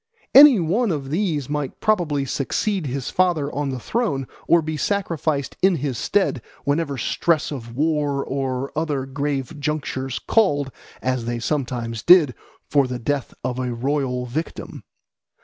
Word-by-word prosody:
Any 275 -5 +9
one 200 +8 +1
of 140 -4 -3
these 160 -6 0
might 145 -2 -3
probably 165 -10 +1
succeed 165 +7 -1
his 135 +1 -3
father 170 -6 +1
on 145 -1 -1
the 130 - -3
throne 145 - -1 0.2
or 170 -1 +5
be 155 0 -3
sacrificed 155 -5 -1
in 190 -1 +4
his 140 -4 -2
stead 155 - 0 0.2
whenever 145 -1 0
stress 155 +6 0
of 120 -5 -7
war 145 -1 0
or 135 0 -3
other 150 -4 -1
grave 140 +1 -3
junctures 140 -3 -2
called, 145 -11 +1 0.3
as 130 -2 -1
they 120 0 -2
sometimes 120 -4 -2
did, 165 -8 +6 0.3
for 140 -3 +3
the 125 0 -3
death 135 +3 -2
of 125 0 -2
a 125 -2 -2
royal 130 0 -1
victim. 150 +7 -5
145 Hz, 150 wpm, -22 LUFS, 130-160 Hz, 0.3 s, Any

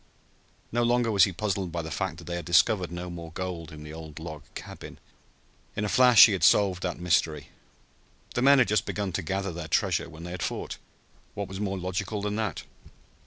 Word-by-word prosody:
No 120 - +1
longer 120 -1 +2
was 100 -4 +6
he 100 - -3
puzzled 95 -1 -2
by 85 0 -3
the 80 - -7
fact 95 -2 -3
that 85 - -11
they 85 +1 -5
had 85 - -4
discovered 90 +1 +3
no 90 +1 -5
more 85 -2 -8
gold 85 -3 -5
in 75 -1 -10
the 75 0 -9
old 80 -1 -10
log 80 -2 -7
cabin. - - -9 0.8
In 105 - -1
a - - -1
flash 125 -4 +8
he 110 - +2
had 95 -4 -1
solved 95 0 +4
that 90 -2 -3
mystery. 80 -4 0 0.8
The 120 - -1
men 140 +2 +6
had 125 - +4
just 105 - +1
begun 100 -2 -2
to - - -2
gather 95 +3 -2
their 85 -1 -6
treasure - - 0
when 80 +1 -11
they 90 - -7
had 90 -1 -6
fought. - - -4 0.6
What 100 -1 -3
was 95 0 -7
more 100 -2 -2
logical 95 +3 -3
than 105 0 -2
that? 110 -6 -2
95 Hz, 215 wpm, -27 LUFS, 85-105 Hz, 0.8 s, flash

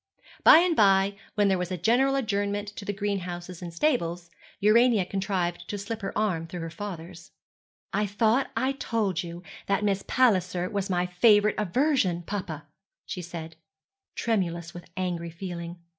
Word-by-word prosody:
By - - +10
and 345 0 +3
by, 195 -2 +4 0.2
when 205 -1 +3
there 190 -2 +2
was 180 0 -3
a 185 - -2
general 245 +10 +3
adjournment 205 -4 -1
to 205 0 -9
the 205 - -1
greenhouses 185 -3 -4
and 175 -1 -6
stables, 170 - -1 0.3
Urania 220 -1 +4
contrived 180 -3 -2
to 205 - -3
slip 220 +3 -5
her 195 - -3
arm 180 -7 0
through 175 +1 -6
her 165 0 -5
father's. 175 -2 -8 0.6
'I 210 +1 +1
thought 220 +6 +1
I 260 +3 +1
told 220 -9 -1
you 170 0 -8 0.2
that 200 +1 +1
Miss 200 -1 +1
Palliser 185 -7 +2
was 200 -1 -2
my 180 -1 +1
favourite 205 +3 +4
aversion, 210 - +1
papa,' 180 -5 -5 0.4
she 180 - -5
said, 165 -2 -8 0.6
tremulous 170 -7 -1
with 175 -1 -11
angry 175 -2 -2
feeling. 170 0 -6
195 Hz, 160 wpm, -27 LUFS, 175-210 Hz, 0.6 s, By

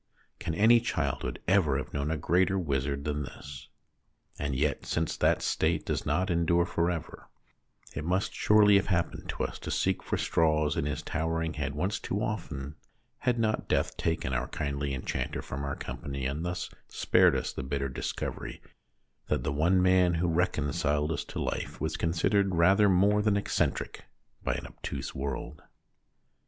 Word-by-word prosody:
Can 80 - -3
any 115 +5 +6
childhood 60 - -2
ever 90 -8 +3
have 70 - -5
known 70 +1 -1
a 80 - 0
greater 90 +5 +2
wizard 70 -4 -1
than 75 0 -2
this? 70 0 -9 0.7
And 70 -2 -1
yet 75 +2 0
since 80 0 -1
that - - +2
state 80 0 +1
does - - -2
not 95 +1 +1
endure 85 +1 +3
for 85 -1 0
ever, 85 -3 -5 0.6
it - - -4
must 90 +5 0
surely 105 -1 +5
have 100 - 0
happened 85 -3 -1
to - - -2
us - - -4
to - - -7
seek 95 -1 +1
for - - -2
straws 80 -2 +2
in 70 - 0
his 75 +1 -3
towering 80 +1 -1
head 75 -2 -3
once 95 +7 -1
too 100 - -2
often, 75 -10 -4 0.4
had 125 -1 +1
not 110 -1 0
death - - +1
taken 80 -5 -1
our 65 +1 0
kindly 70 -1 -2
enchanter 60 - -3
from 70 +1 -5
our 70 0 -2
company, 65 +2 -5
and 70 +4 -2
thus 90 0 -3 0.2
spared - - +4
us - - -2
the - - -4
bitter 70 +1 -2
dis 65 - -3
covery - - -5 0.7
that - - 0
the 70 - -1
one 90 +5 +3
man 90 -2 +4
who 85 +2 +1
reconciled 75 -2 +1
us - - -2
to - - -6
life - - -3
was - - -2
considered 90 +3 +1
rather 95 +5 +5
more 100 +3 +4
than 105 -1 +2
eccentric 100 - -1 0.4
by - - 0
an - - -5
obtuse 70 0 -6
world. 70 +2 -4
80 Hz, 170 wpm, -29 LUFS, 70-95 Hz, 0.7 s, any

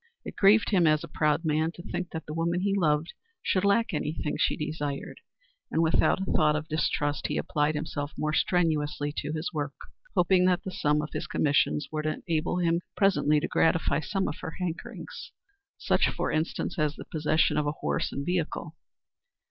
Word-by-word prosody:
It - - -7
grieved 210 +3 +5
him 180 -5 +4
as 155 -1 +3
a - - -6
proud 150 +2 0
man 155 +1 +1
to 175 - -11
think 175 0 -4
that 160 -1 -6
the 150 - -6
woman 170 +2 0
he 195 +1 +1
loved 160 -4 +1 0.3
should 185 - +1
lack 200 +2 +2
any 150 -1 -1
thing 150 -2 -3
she - - +1
desired, 150 -2 -4 0.5
and 165 - +1
without 160 +3 +3
a 190 - -2
thought 150 -2 +3
of 155 +1 -3
distrust 150 -2 0
he - - -2
applied 150 +1 0
himself 150 -1 -3
more 155 0 -1
strenuously 150 -4 +1
to - - -2
his 160 +3 -3
work, 145 -2 -3 0.4
hoping 180 +1 +4
that 180 0 +2
the 190 - -5
sum 150 -3 +1
of 150 - -6
his - - -3
commissions 145 0 +1
would 155 0 -2
enable 160 +2 -1
him 170 -1 +1 0.2
presently 180 -7 +3
to - - -1
gratify 165 -3 +2
some 190 +6 -1
of 150 - -5
her 160 - -6
hankerings 180 - -6 0.4
such, - - +2
for - - -2
instance, 160 +2 -2
as 150 -1 +1
the - - -9
possession 155 0 +1
of 150 -1 +1
a 145 - 0
horse - - -2
and 140 - -4
vehicle. 170 -2 -2
155 Hz, 190 wpm, -28 LUFS, 150-175 Hz, 0.5 s, grieved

